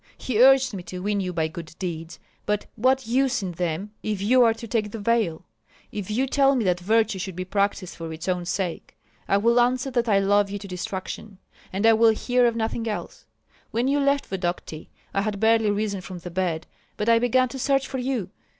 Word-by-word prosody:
He 240 -3 0
urged 265 -1 +6
me 190 - -5
to 180 - -5
win 205 0 0
you 185 -2 -2
by 160 -2 0
good 160 0 -9
deeds. 165 -2 -5 0.3
But 210 0 0
what 260 +3 +2
use 255 0 +1
in 185 - -3
them 175 +3 -3
if 210 -2 -2
you 245 +6 +4
are 230 -1 +4
to 230 0 -8
take 215 -1 -1
the 225 - -6
veil? 215 -6 0 0.5
If 205 -2 -5
you 240 +5 +1
tell 275 0 +3
me 245 - +1
that 180 -1 +2
virtue 215 +1 +1
should 185 -1 -5
be 185 +1 -4
practised 200 -1 -1
for 165 -1 -6
its 160 +2 -7
own 180 -1 -1
sake, 180 -1 -3 0.3
I 200 - +3
will 235 +4 +3
answer 255 +2 +1
that 240 -2 0
I 200 - +4
love 200 +1 +3
you 205 - -4
to 200 0 -9
distraction, 190 +2 -6 0.3
and 195 +3 -1
I 225 - +7
will 225 0 +5
hear 245 +2 +2
of 235 - 0
nothing 225 0 -2
else. 210 - -5 0.4
When 235 +3 0
you 285 +1 +2
left 280 0 +2
Vodokty, 175 -4 -4 0.2
I 195 - +1
had 205 -1 -2
barely 225 0 +4
risen 205 -1 -1
from 185 0 -8
the 175 0 -8
bed 170 -3 -1 0.3
but 210 - -2
I 230 0 +5
began 255 +2 +3
to 265 - -7
search 270 +1 +1
for 265 - -4
you. 245 -7 -2
210 Hz, 220 wpm, -24 LUFS, 185-240 Hz, 0.5 s, I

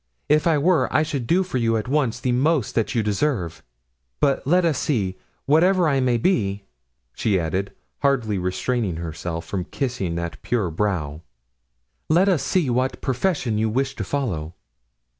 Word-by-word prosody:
If 150 +2 +3
I 160 -2 +4
were 165 +4 +2
I 155 - +3
should 140 -6 -3
do 185 +7 +3
for 180 -9 -3
you 115 -1 +2
at 110 - -3
once 130 -5 0
the 125 +1 0
most 135 +1 +1
that 115 +2 0
you 115 - +2
deserve. 100 - -1 0.6
But 135 - +1
let 180 +3 +4
us 155 -5 +1
see; 100 -12 -1 0.3
whatever 175 +4 +4
I 140 -3 +2
may 125 -2 +2
be," 100 - 0 0.5
she 100 -4 +1
added, 95 +4 -2 0.3
hardly 125 -8 +1
restraining 95 +2 -1
herself 85 0 -5
from 90 0 -3
kissing 110 - -3
that 85 0 -5
pure 105 -8 -1
brow, 80 -5 -2 0.9
"let 175 +5 +4
us 180 -7 +3
see 180 -6 +1
what 130 +1 0
profession 130 - 0
you 110 0 +1
wish 135 +4 -1
to - - -3
follow." 90 - -3
120 Hz, 165 wpm, -23 LUFS, 95-145 Hz, 0.9 s, I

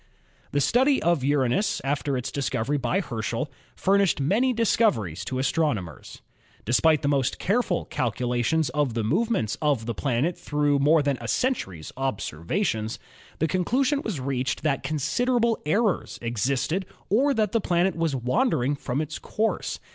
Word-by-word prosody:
The 145 - +1
study 265 - +3
of 170 -5 +2
Uranus 145 - +1
after 140 0 -1
its 125 +1 -4
discovery 140 0 -1
by 185 +8 0
Herschel 115 - -3 0.2
furnished 195 -4 +2
many 210 - +2
difficulties 200 - +1
to 130 - -3
astronomers. 130 - -2 0.4
Despite 150 +6 +3
the - - +1
most 135 -2 +1
careful 200 -2 0
calculations 125 +3 0
of 135 -3 -1
the 115 - 0
movements 185 - 0
of 145 -7 +1
the 115 - -2
planet 135 - 0
through 145 -4 +1
more 150 +2 +4
than 140 -3 0
a 115 - -5
century's 95 - -1
observations, 110 - -2 0.4
the 160 - +1
conclusion 250 - +1
84 255 - -4
ASTRONOMY 150 -11 -4
was 135 -1 -1
reached 130 0 -2
that 140 -4 +1
considerable 225 - +1
errors 205 +4 +1
existed 135 - -1 0.2
or 270 +6 +3
that 215 -3 +1
the 230 - +1
planet 180 +1 +1
was 165 -4 0
wandering 140 - +1
from 140 0 -2
its 155 0 -5
course. 220 +1 -2
145 Hz, 150 wpm, -25 LUFS, 125-195 Hz, 0.4 s, more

